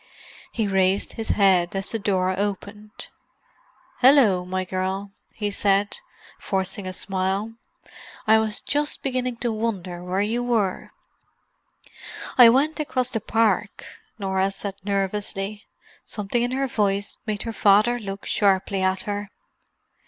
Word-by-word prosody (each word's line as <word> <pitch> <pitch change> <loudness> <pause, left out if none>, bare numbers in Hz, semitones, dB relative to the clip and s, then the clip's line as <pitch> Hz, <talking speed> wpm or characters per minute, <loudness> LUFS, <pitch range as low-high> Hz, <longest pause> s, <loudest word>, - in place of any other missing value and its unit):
He 220 -3 -1
raised 190 0 +1
his 225 -1 -5
head 190 -3 +3
as 195 0 -1
the 225 - -2
door 185 -2 +1
opened. 205 +1 -5 0.9
"Hallo, 245 -9 +5
my 185 +1 -3
girl," 190 +2 -3 0.2
he 210 -2 -3
said, 200 - +1 0.4
forcing 190 0 -2
a - - -3
smile. 190 +3 -2 0.7
"I 220 0 +5
was 220 -1 -2
just 295 +1 -1
beginning 255 -2 -2
to 235 - +1
wonder 195 -6 -3
where 185 +2 -1
you 225 +4 0
were." 225 -6 -1 1.5
"I 245 -2 +9
went 285 +7 +2
across 255 -4 -1
the 225 - -2
park," 210 -2 0 0.3
Norah 190 -1 0
said 195 0 -5
nervously. 200 +1 -3 0.4
Something 210 +3 -2
in 245 +1 -1
her 270 +1 0
voice 205 -5 -1
made 215 -1 -2
her 230 - -4
father 215 +4 +4
look 200 -2 -7
sharply 195 -1 +1
at 190 0 0
her. 205 -1 -4
205 Hz, 130 wpm, -24 LUFS, 195-225 Hz, 1.5 s, I